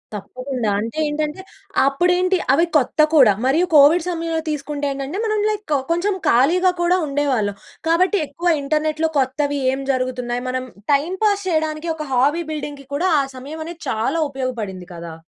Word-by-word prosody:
తప్పకుండా. 255 +2 -4
అంటే 225 +7 -5
ఏంటంటే, 300 +4 -3 0.5
అప్పుడేంటి 360 +6 +2 0.2
అవి 330 +5 +4
కొత్త 290 +2 +1
కూడా 255 -9 +7
మరియు 305 +7 +3
కోవిడ్ 305 +4 +6
సమయంలో 330 -1 -2
తీసుకుంటే 295 0 -3
ఏంటంటే, 275 +7 -4
మనం 430 -1 0
లైక్ 410 -8 -2 0.2
కొంచెం 355 +5 +1 0.2
ఖాళీగా 340 +10 +4
కూడా 355 +1 +3
ఉండేవాళ్ళం. 265 -8 0 0.3
కాబట్టి, 370 +5 +3
ఎక్కువ 340 +5 0
ఇంటర్నెట్‌లో 310 +2 0
కొత్తవి 280 +2 0
ఏం 265 - -3
జరుగుతున్నాయి 250 -1 -2
మనం 255 0 -2 0.3
టైమ్ 325 +7 0
పాస్ 405 -2 +1
చేయడానికి 315 0 -1
ఒక 305 -1 -5
హాబీ 290 +7 +2
బిల్డింగ్‌కి 290 -3 -6
కూడా 360 +6 +1
ఆ - - +3
సమయం 290 +5 -8
అనేది 335 0 -9
చాలా 245 +9 0
ఉపయోగపడింది 235 -9 -4
కదా! 170 -1 -8
295 Hz, 150 wpm, -20 LUFS, 260-335 Hz, 0.5 s, కూడా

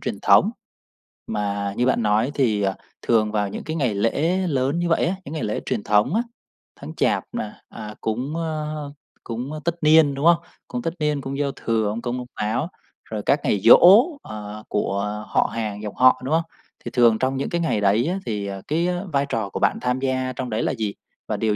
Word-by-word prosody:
truyền - - -4
thống. - - +5 0.8
Mà 100 -1 -2
như 125 - +2
bạn 130 -2 +2
nói 110 +6 +2
thì, 110 -7 +2
ờ, 95 -1 +1 0.3
thường 110 -2 +2
vào 105 -2 0
những - - -6
cái 155 - -4
ngày 130 -9 0
lễ 145 - +1
lớn 140 +2 0
như 175 0 0
vậy 165 - +2
á, 185 +3 0
những 145 - -7
ngày 155 - -3
lễ 105 - -1
truyền 105 - -2
thống 105 - +2
á, 230 - +3 0.6
tháng - - -8
Chạp - - +1
nè, 105 - -3 0.2
à, 105 -1 -8
cúng, 125 +7 -2
a, 155 -2 -2 0.6
cúng 120 +5 -5
tất 170 - 0
niên, 155 -2 +6
đúng 140 +3 -3
không? 170 0 +7 0.3
Cúng 245 -1 -4
tất 165 -6 -2
niên, 150 -2 0
cúng 135 +1 -5
giao 140 -1 0
thừa, 110 -4 -1
ông 110 +3 -4
Công 125 0 -3
ông 125 -1 -6
Táo, 115 +10 -1 0.4
rồi 110 -1 -5
các 140 - +3
ngày 100 - +1
giỗ, 115 - +8 0.4
à, 105 0 -8
của 100 -1 -1 0.3
họ - - +1
hàng 105 -2 -3
dòng 105 -2 -6
họ, 130 0 +5
đúng 145 - -1
không? 165 +1 +3 0.4
Thì 120 - -4
thường 115 -3 +4
trong 130 +1 0
những 135 - -2
cái 170 - -1
ngày 135 -11 0
đấy 105 +7 +3
á 190 +2 -1
thì, 105 -3 -3
ờ, 95 -1 -6
cái 165 +4 +1
á 180 0 -1
vai 140 0 +2
trò 110 -3 -2
của - - -5
bạn - - +2
tham 125 +1 0
gia 130 -1 -1
trong 130 -1 -4
đấy 110 - -1
là - - +1
gì 105 -2 -2 0.3
và - - -2
điều 110 -2 +1
125 Hz, 225 wpm, -23 LUFS, 105-150 Hz, 0.8 s, giỗ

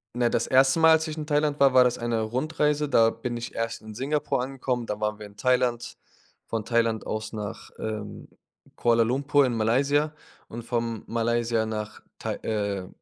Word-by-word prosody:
Na, 120 -1 +2
das - - 0
1. 130 +4 +4
Mal, 160 0 +7
als 160 0 +3
ich 155 - -5
in 150 -1 -5
Thailand 150 -1 +1
war, 135 -2 +5
war 130 - +7
das 125 -1 +1
eine 120 -1 -1
Rundreise. 150 +5 0
Da 115 -4 +5
bin 120 +1 -5
ich 115 - -6
erst 115 -2 -3
in 110 0 -10
Singapur 135 +2 -1
angekommen, 130 -2 -3
dann 105 -1 -4
waren 105 0 -1
wir 105 - -8
in 100 0 -15
Thailand, 125 -2 0 0.5
von 115 -2 -3
Thailand 115 -2 +1
aus 110 +1 -4
nach, 105 -2 -6
ähm, 105 -1 -6 0.5
Kuala 115 -1 +3
Lumpur 140 +4 +2
in 125 - -1
Malaysia 140 +7 +2 0.3
und 115 +1 -8
von 115 -1 -2
Malaysia 115 -1 0
nach 105 -1 -5 0.2
Thai - - -3
äh, 100 -4 -2
120 Hz, 185 wpm, -26 LUFS, 110-135 Hz, 0.5 s, Mal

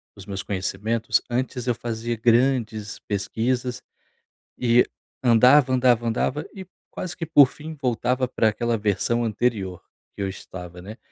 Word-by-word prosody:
os 100 -2 -12
meus 100 -1 -5
conhecimentos, 105 +4 -1
antes 125 0 -2
eu 120 - +2
fazia 115 +1 -3
grandes 115 -2 +1
pesquisas 120 +5 -2 0.8
e 120 0 +4 0.4
andava, 125 +3 +6
andava, 125 -2 +3
andava 125 +6 -1
e 190 -2 -8 0.2
quase 185 - -5
que 165 - -3
por 145 -4 +7
fim 155 +4 -9
voltava 125 0 0
para 115 -3 +2
aquela 115 +2 -1
versão 105 +3 0
anterior 105 -5 -1 0.4
que - - -7
eu 95 - -1
estava, 90 -2 -9
né. 105 +4 -9
120 Hz, 140 wpm, -24 LUFS, 105-125 Hz, 0.8 s, por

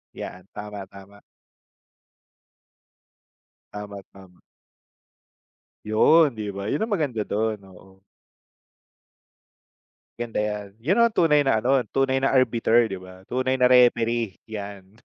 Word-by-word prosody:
Yan, 90 +1 -8
tama-tama. 100 -1 -10 2.5
Tama-tama. 100 -3 -11 1.4
Yun, 140 +7 +4
di 105 -2 -5
ba? 100 0 -6
Yun 140 - -2
ang 225 - -1
maganda 145 - -1
dun, 105 0 -2
oo. 95 0 -18 2.2
Ganda 120 -2 -3
yan. 105 -1 -3
Yun 165 - 0
ang 235 - +3
tunay 150 -6 +3
na 110 -5 +2
ano, 130 +2 +2
tunay 135 0 +1
na 135 - +2
arbiter, 120 -2 +3
di 95 - -5
ba? 95 0 -13
Tunay 130 +1 -1
na 125 - +5
referee, 120 -4 +3
yan. 100 -2 -8
110 Hz, 110 wpm, -24 LUFS, 100-130 Hz, 2.5 s, na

